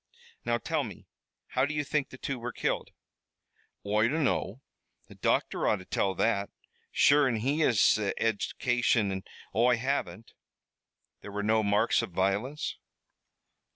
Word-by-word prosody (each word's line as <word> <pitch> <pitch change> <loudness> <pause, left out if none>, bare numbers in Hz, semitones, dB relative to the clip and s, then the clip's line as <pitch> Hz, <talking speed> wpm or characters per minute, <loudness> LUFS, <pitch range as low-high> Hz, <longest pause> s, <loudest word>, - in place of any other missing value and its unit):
"Now, 120 0 +1
tell 155 +4 -1
me, 105 -7 -9 0.4
how 130 - +1
do 150 - -4
you 150 - 0
think 145 -1 -1
the 130 - -11
two 135 -1 -4
were 120 +1 -4
killed?" - - -2 1.0
"Oi 105 +2 +2
dunno. 130 - -1 0.5
The - - -13
docther - - 0
ought - - +3
to 95 -2 -10
tell 95 +1 0
that 100 0 +1 0.4
sure 145 -1 +5
an' 125 - 0
he 135 +8 0
has 125 -9 +4
the 105 -2 -2
eddication, 115 0 +1
an' 95 0 -4 0.3
Oi 120 +1 +4
haven't." 115 -5 -3 0.9
"There 105 - -9
were 105 +1 -3
no 110 +1 +3
marks 105 +3 +2
of 115 - -5
violence?" 100 - -1
115 Hz, 150 wpm, -29 LUFS, 105-130 Hz, 1.0 s, sure